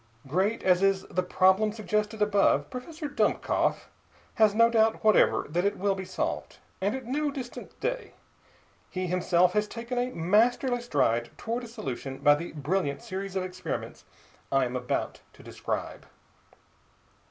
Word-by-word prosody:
Great 190 +11 0
as 180 -1 +4
is 195 -1 +2
the 185 - +1
problem 190 +3 +3
suggested 215 0 -1
above, 205 -1 +2
Professor 305 +5 -6
Dummkopf 285 - 0 0.5
has 215 -2 +4
no 230 +1 +6
doubt 225 -1 +2
whatever 215 -1 +4
that 175 +4 0
it 200 +1 0
will 200 +1 +1
be 190 0 -5
solved, - - -3 0.2
and 200 +5 +1
at 260 -2 -6
no 290 +5 0
distant 265 -4 -8
day. - - -3 0.8
He 185 0 -3
himself 180 0 +2
has 210 0 +1
taken 235 +3 -4
a 245 +1 0
masterly 240 +6 +2
stride 120 - +1
toward 235 +2 -3
a - - -9
solution 135 - -6
by 145 - +5
the 160 +4 -4
brilliant 150 0 -1
series 195 -3 -5
of 190 - 0
experiments 185 0 -5 0.5
I 135 -1 +3
am 125 +1 -4
about 125 0 -2
to - - -16
describe. - - -5
200 Hz, 155 wpm, -28 LUFS, 180-230 Hz, 0.8 s, no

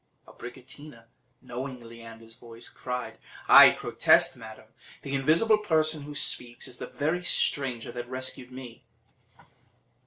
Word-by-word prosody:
Abricotina, 130 +1 -12 0.4
knowing 130 +1 -7
Leander's 115 -1 -13
voice, 115 -1 -11
cried: 125 -1 -6 0.3
"I - - +10
protest, - - +2
madam, - - -13 0.3
the 140 - -6
invisible 165 +11 +3
person 155 -6 0
who 145 0 -9
speaks 120 -4 0
is 125 - -10
the - - -6
very 160 +5 -2
stranger 130 -8 -1
that 120 0 -7
rescued 130 0 -5
me." 125 -3 -11
130 Hz, 120 wpm, -27 LUFS, 120-145 Hz, 0.4 s, I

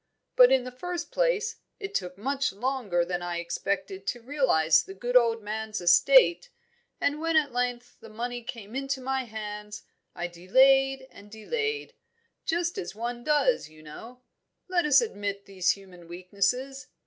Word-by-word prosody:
But - - +8
in 260 -2 +4
the 255 - -7
first 350 +7 -5
place, 470 -3 0 0.2
it 405 0 -6
took 180 - -3
much 270 +5 -1
longer 205 -5 -1
than 175 0 -3
I 175 -1 -3
expected 190 +3 -3
to 245 - -2
realise 230 - +3
the 195 - -11
good 245 +5 -4
old 230 -3 +4
man's 215 +1 -4
estate, 175 0 +5 0.5
and 290 +1 0
when 330 0 -1
at 295 -3 +2
length 245 0 -3
the 225 - -13
money 240 +3 -5
came 225 -2 -9
into 275 0 -2
my 265 0 -2
hands, 210 -1 -7 0.3
I 175 - -3
delayed 265 +10 +3
and 205 - -15
delayed 440 - -3 0.5
just 345 +1 -1
as 175 +2 -6
one 240 +2 -4
does, 300 - +2
you 155 0 -17
know; 235 +12 -11 0.4
let 360 -3 +1
us 280 -3 +6
admit 200 -3 -4
these 190 -2 +1
human 185 -3 -15
weaknesses. 200 +10 -2
240 Hz, 160 wpm, -27 LUFS, 195-270 Hz, 0.5 s, But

